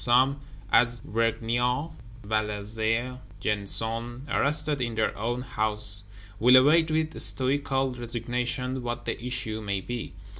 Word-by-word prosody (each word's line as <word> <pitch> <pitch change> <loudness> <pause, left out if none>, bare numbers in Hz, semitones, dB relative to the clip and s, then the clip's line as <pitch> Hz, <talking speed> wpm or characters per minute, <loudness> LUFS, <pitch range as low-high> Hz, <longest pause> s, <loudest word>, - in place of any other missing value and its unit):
Some, 130 +3 +3 0.3
as 120 -1 +3
Vergniaud, 120 +6 -1 0.3
Valazé, 110 +3 -2 0.2
Gensonné, 115 +4 -2
"arrested 150 -1 0
in 120 -2 -2
their 110 -1 0
own 120 +4 -3
houses," 105 -3 +5 0.4
will 125 +3 +6
await 155 +5 +5
with 155 0 -1
stoical 135 0 0
resignation 125 +2 -3
what 120 0 -5
the - - -4
issue 120 -3 -3
may 100 -2 -2
be. 120 +2 -6
120 Hz, 115 wpm, -26 LUFS, 110-130 Hz, 0.4 s, will